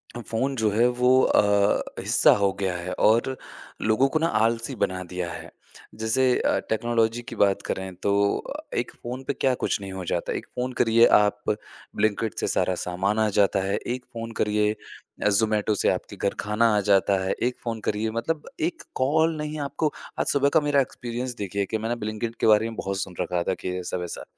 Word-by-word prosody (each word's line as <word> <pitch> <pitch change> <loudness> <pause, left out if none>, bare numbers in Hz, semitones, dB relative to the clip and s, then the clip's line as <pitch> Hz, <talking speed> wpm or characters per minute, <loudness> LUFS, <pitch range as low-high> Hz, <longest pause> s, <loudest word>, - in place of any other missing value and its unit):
अ, - - -5
phone 135 +4 -1
जो 110 -3 +1
है 115 +4 +4
वो 125 0 +4
अ, 100 0 +3 0.2
हिस्सा - - +4
हो 100 -1 +3
गया 95 -2 -1
है 90 +1 -5
और 120 +4 +2 0.5
लोगों 110 +5 +3
को 155 - 0
ना 165 - +2 0.2
आलसी 115 +3 0
बना 95 0 -1
दिया 90 -1 -4
है। - - -9 0.5
जैसे 110 +4 +1 0.2
अ, - - +1
टेक्नोलॉजी 115 +1 +1
की - - -9
बात 100 -1 +2
करें 95 0 -3
तो 100 - +2 0.2
अ, - - -6 0.2
एक - - -1
फ़ोन 125 +2 -5
पे 140 - 0
क्या 130 0 +1
कुछ - - 0
नहीं 95 - -6
हो 95 -1 -5
जाता। 85 - -1
एक - - -4
फ़ोन 125 +1 -2
करिए 115 0 +5
आप 105 0 +1 0.5
ब्लिंकिट 110 +1 0
से - - -1
सारा 95 - +1
सामान 95 +4 0
आ 110 - +3
जाता 100 -1 +3
है, 100 - 0
एक 125 +1 -5
फ़ोन 115 0 -5
करिए, 105 0 +2 0.5
अ, 105 - +4
ज़ोमैटो 105 0 +2
से - - +4
आपके - - -6
घर - - -1
खाना 105 +1 +2
आ - - +4
जाता 100 0 +4
है, 95 - -1
एक 125 +1 -1
फ़ोन 115 -2 -3
करिए 110 +1 -1
मतलब 160 +4 -3 0.2
एक 335 - -15
कॉल 160 +5 +2
नहीं 150 0 -4
आपको 155 -2 -1 0.3
आज - - +1
सुबह 140 0 +4
का - - +4
मेरा 140 -1 +4
एक्सपीरियंस 125 0 -5
देखिए 100 +1 -2
कि 110 - -2
मैंने 115 +2 -2
ब्लिंकिट 110 +2 -3
के - - +2
बारे 110 +1 +5
में 115 - -8
बहुत 100 0 -3
सुन 90 -2 -6
रखा 90 -1 -1
था 95 - 0
कि 90 0 -2
ऐसा-वैसा। 90 -1 -5
110 Hz, 205 wpm, -25 LUFS, 100-120 Hz, 0.5 s, करिए